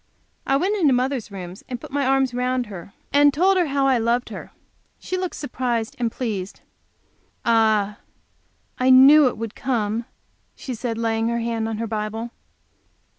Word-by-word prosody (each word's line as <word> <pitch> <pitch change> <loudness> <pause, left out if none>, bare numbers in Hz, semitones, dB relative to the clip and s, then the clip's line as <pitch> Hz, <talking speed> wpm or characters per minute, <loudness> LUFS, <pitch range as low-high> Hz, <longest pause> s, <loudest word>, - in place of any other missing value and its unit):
I 270 - +3
went 380 +8 0
into 290 -5 +4
mother's 255 -2 -1
room 180 -3 -7 0.2
and 245 -2 -4
put - - -11
my 280 -1 0
arms 265 -1 +2
round 250 0 -1
her 195 -3 -10 0.2
and 290 0 +6
told 370 +7 +3
her 360 -3 +2
how 275 -1 0
I 265 -3 +3
loved 235 +2 0
her. - - -9 0.5
She 370 - -5
looked 370 -1 -3
surprised 245 -5 -3
and 235 -2 0
pleased. 205 -7 -4 0.8
"Ah, 220 -3 +2 0.8
I 255 +1 +3
knew 270 +3 +8
it 245 - -2
would 225 -1 -5
come!" 230 -3 -2 0.5
she 260 - -6
said, 230 -1 -4
laying 225 0 0
her 235 0 0
hand 230 -1 -2
on 220 - -3
her 230 - -2
Bible. 220 +1 -4
240 Hz, 170 wpm, -22 LUFS, 225-270 Hz, 0.8 s, knew